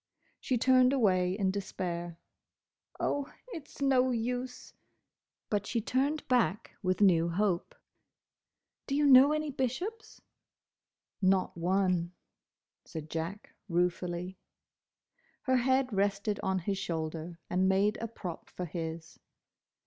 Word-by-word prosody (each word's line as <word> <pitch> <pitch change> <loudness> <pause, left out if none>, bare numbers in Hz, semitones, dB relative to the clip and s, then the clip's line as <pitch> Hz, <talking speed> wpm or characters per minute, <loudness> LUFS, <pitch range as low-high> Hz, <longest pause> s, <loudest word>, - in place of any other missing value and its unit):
She 255 - 0
turned 255 +1 +5
away 185 -8 +3
in 195 -3 +1
despair. 175 -3 -4 0.8
"Oh, 285 -1 -1 0.2
it's 320 - -9
no 260 -2 +4
use!" 250 +1 -3 0.7
But 205 -1 -1
she 235 - 0
turned 275 +7 0
back 235 -4 +1
with 185 0 0
new 170 -4 +5
hope. 180 0 0 1.1
"Do 275 - -1
you 295 0 +3
know 270 +1 +8
any 305 -1 -1
Bishops?" 285 - -4 1.0
"Not 190 -1 +2
one," 180 0 +1 0.7
said 155 -1 -8
Jack, 165 +6 -4 0.2
ruefully. 180 +1 -1 1.0
Her 260 -1 +3
head 260 0 +2
rested 200 +1 0
on 190 0 0
his 195 +2 -2
shoulder, 165 -1 -4
and 185 +1 +2
made 200 +2 +2
a 230 - -2
prop 180 -6 -7
for 180 - -5
his. 160 -1 -6
200 Hz, 115 wpm, -31 LUFS, 175-255 Hz, 1.1 s, know